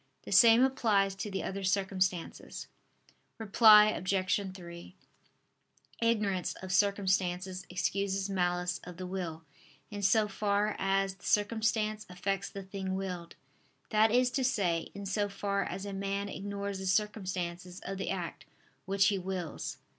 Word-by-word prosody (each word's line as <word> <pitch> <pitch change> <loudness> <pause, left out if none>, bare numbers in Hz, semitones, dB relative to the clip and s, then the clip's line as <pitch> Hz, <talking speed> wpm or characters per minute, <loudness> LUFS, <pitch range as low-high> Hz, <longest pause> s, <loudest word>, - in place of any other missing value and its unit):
The - - -9
same 230 +1 +7
applies 210 -7 +2
to 195 +2 -5
the 195 - -3
other 195 +1 -4
circumstances. 190 -2 -1 0.7
Reply 215 0 +7
Obj. 190 0 0
3: 170 0 -10 1.1
Ignorance 210 -5 +1
of 190 0 -7
circumstances 190 -1 +1
excuses 190 +1 -1
malice 180 -2 0
of 180 -1 -10
the 185 - -5
will, 175 -4 -5 0.5
in 205 -1 -5
so 210 +2 +3
far 205 0 0
as 195 0 +1
the 190 - -17
circumstance 215 0 +1
affects 195 +2 -2
the 195 - -7
thing 190 0 -4
willed: 180 -3 -5 0.6
that 215 0 +5
is 250 +1 +3
to 265 - 0
say, 185 -10 0
in 200 0 -6
so 205 +1 0
far 200 0 -1
as 190 +3 -5
a 200 - -5
man 200 +1 -2
ignores 200 0 -4
the 190 - -4
circumstances 185 -3 -2
of 195 +1 -5
the - - -3
act 180 -3 -4 0.4
which 195 0 +3
he 200 -2 0
wills. 180 -4 -4
195 Hz, 140 wpm, -31 LUFS, 185-205 Hz, 1.1 s, same